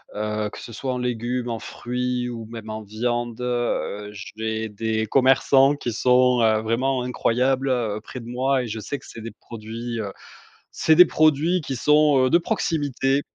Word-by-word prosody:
heu, 105 0 -2
que - - -9
ce 115 - -9
soit 130 +2 -3
en - - -3
légumes, 125 0 -2
en 115 -1 -3
fruits 125 0 -3
ou 115 -2 -6
même 110 -1 -9
en 110 0 -5
viande. 120 +3 -3
Heu, 120 -4 -2 0.3
j'ai 110 0 -2
des 110 +1 -2
commerçants 135 +2 +4
qui 120 -4 -4
sont, 125 +1 +3
heu, 110 -1 +3
vraiment 125 +3 0
incroyables, 130 +2 0
heu, 110 -4 0
près 125 +2 -9
de 115 - -11
moi 130 +1 0
et - - -5
je 110 0 -5
sais 140 +6 -4
que - - -17
c'est 115 - -10
des 115 - -7
produits, 115 +1 -7
heu, 100 -3 -4 0.6
c'est 160 - +3
des 180 +1 +9
produits 155 +3 +2
qui 135 -2 -4
sont, 150 +2 +4
heu, - - 0
de - - +7
proximité, 145 -5 0
120 Hz, 185 wpm, -23 LUFS, 110-135 Hz, 0.6 s, des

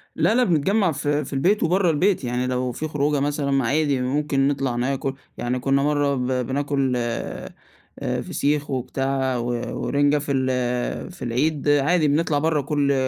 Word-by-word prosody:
لأ 225 - +2
لأ 250 - +4
بنتجمع 185 +2 +2
في 145 +1 -1
في - - -8
البيت 180 +10 +2
وبرّا 180 +2 +2
البيت، 175 +3 +2
يعني 125 +1 -1
لو 125 0 -1
فيه 155 +6 -4
خروجة 150 -1 0
مثلًا 145 0 -1
ما 135 -2 +2
عادي 145 -1 +1
ممكن 135 +1 +1
نطلع 135 -3 -1
ناكل، 135 +2 -1 0.2
يعني 125 +1 -2
كنا 135 +2 +1
مَرّة 145 -1 +1
ب 125 -1 -2 0.2
بناكل 140 -1 0
آآ، 120 -1 -4 0.7
فسيخ 145 0 -1
وبتاع 135 0 -1
و 120 - -3 0.4
ورنجة 145 +1 +2
في 145 0 -3
ال 125 +2 -1
في 180 - -16
العيد 145 +5 0
عادي، 150 +3 +3
بنطلع 150 0 +1
برّا 155 -1 +1
كُلّ 140 0 +1
140 Hz, 165 wpm, -23 LUFS, 130-150 Hz, 0.7 s, لأ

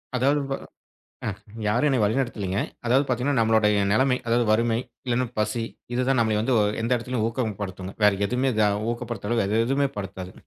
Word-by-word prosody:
அதாவது 140 +4 +2 0.9
அ - - +1 0.4
யாரும் 120 +7 +2
என்னை 130 -3 +2
வழிநடத்தலைங்க. 105 -4 0 0.3
அதாவது 130 +4 +4
பாத்தீங்கன்னா, 125 +2 +1
நம்மளோட 110 -1 +3 0.3
நெலைமை! 130 +3 +3
அதாவது 120 +1 +2
வறுமை 115 +1 +2 0.3
இல்லன்னா 125 +1 +1
பசி. 110 +2 0 0.3
இது 125 - +1
தான், 135 - +3
நம்மள 110 -2 +2 0.4
எந்த 115 - -2
இடத்திலும் 120 -1 -2
ஊக்கப்படுத்துங்க. 100 -5 -4
வேற 105 - +6 0.2
எதுவுமே 130 +2 +1 0.4
ஊக்கப்படுத்தற 120 -2 -5
அளவுக்கு 110 -1 +1
எதுவுமே 140 +1 +1
படுத்தாது. 95 -2 -6
115 Hz, 145 wpm, -25 LUFS, 105-125 Hz, 0.9 s, வேற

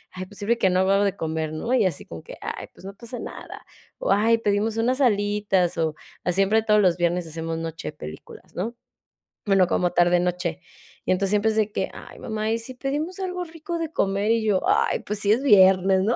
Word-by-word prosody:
"Ay, 185 0 -5
pues, 200 - -16
sirve 210 +3 +2
de - - -5
que 190 - +3
no 180 +1 +3
hago 190 +1 +2
algo 200 +1 +3
de 200 - -1
comer", 160 -1 -3
¿no?, 230 +11 -2
y 240 -5 +4
así 185 - -2
como 80 -1 -9
que: - - -10
"Ay, - - -5
pues, - - -16
no 195 - -7
pasa 235 +3 -8
nada", - - -9 0.3
o: - - 0
"Ay, 225 +3 +4
pedimos 210 +1 0
unas 250 +4 +1
alitas 205 -6 +1
o 160 -2 0 0.4
siempre 195 +4 +3
todos 210 -1 +4
los 180 -3 +3
viernes 175 0 0
hacemos 165 +1 -4
noche 165 -1 -5
películas", 75 +1 -11
¿no?, 225 +7 -3 0.7
bueno, 195 -2 +4
como 180 0 +1
tarde 175 0 +4
noche. 180 -1 -2 0.4
Y - - +1
entonces, 190 +1 +1
siempre 210 +1 +2
es 220 - -3
de 215 -1 +1
que: - - -1
"Ay, - - -11
mamá, 215 -1 -3
¿y 225 - 0
si 255 +3 -7
pedimos 295 +8 -3
algo 365 -1 -3
rico 330 +1 -6
de 325 -2 -3
comer?", 200 -3 +1
y 230 -1 +1
yo: 200 -3 +2
"Ay, - - +2
pues, 210 0 -4
sí, 205 0 +2
es 245 +5 0
viernes", 190 -5 +6
¿no?, 225 +4 +2
200 Hz, 225 wpm, -24 LUFS, 180-225 Hz, 0.7 s, viernes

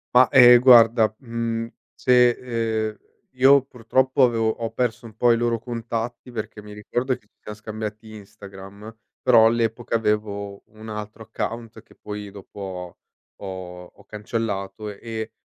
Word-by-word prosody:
Ma, 125 -1 +7
ehm, 125 -2 +8
guarda, 115 -3 +6
mhmm, 115 -2 -3 0.3
se, 125 -1 +4 0.6
ehm, 105 - -13 0.3
io 135 +1 +5
purtroppo 130 +2 +1
avevo 115 -3 +2
ho 115 0 -4
perso 120 -1 -2
un 110 -2 -13
po' 120 0 +4
i - - +2
loro 120 -1 0
contatti, 115 +1 -5
perché 110 -2 -6
mi 105 0 -12
ricordo 120 +5 -3
che 105 - -31
ci - - -56
siam 105 - -8
scambiati 110 0 -7
Instagram, 100 +1 -12 0.3
però 115 -3 +6
all'epoca 115 +1 -1
avevo 105 -2 -2
un 110 +1 -14
altro 105 +1 -7
account, 115 +1 -6
che - - -23
poi 105 -1 -8
dopo 100 +1 -13
ho 90 -2 -7 0.4
ho 90 -2 -8
ho - - -21
cancellato, 105 -2 -4
e 110 +2 -7
110 Hz, 145 wpm, -23 LUFS, 105-120 Hz, 0.6 s, ehm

